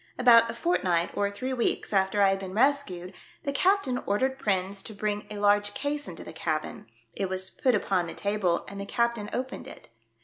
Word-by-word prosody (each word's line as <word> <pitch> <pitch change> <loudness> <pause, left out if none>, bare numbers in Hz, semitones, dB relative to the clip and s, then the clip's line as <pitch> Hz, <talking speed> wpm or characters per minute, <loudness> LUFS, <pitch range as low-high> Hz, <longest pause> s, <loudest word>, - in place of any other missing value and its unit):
About 230 -2 +6
a 230 - -4
fortnight 180 - +1
or 200 0 +1
three 255 +6 -4
weeks 240 -3 -1
after 195 +1 +3
I 195 - +6
had 195 0 0
been 190 0 -7
rescued, 215 -9 +1 0.3
the 280 - -2
captain 360 -6 +2
ordered 260 +6 0
Prins 195 0 -1
to 215 - -8
bring 210 0 -2
a 210 - -6
large 205 0 +2
case 290 +1 -2
into 175 - -8
the - - -9
cabin; 155 -6 -3 0.3
it 195 -2 -2
was 185 0 -2
put 255 -3 +2
upon 190 -4 0
the - - -7
table 200 -4 0
and 200 0 -7
the 200 - -6
captain 235 -2 0
opened 260 +1 -4
it. - - -12
205 Hz, 200 wpm, -27 LUFS, 190-250 Hz, 0.3 s, About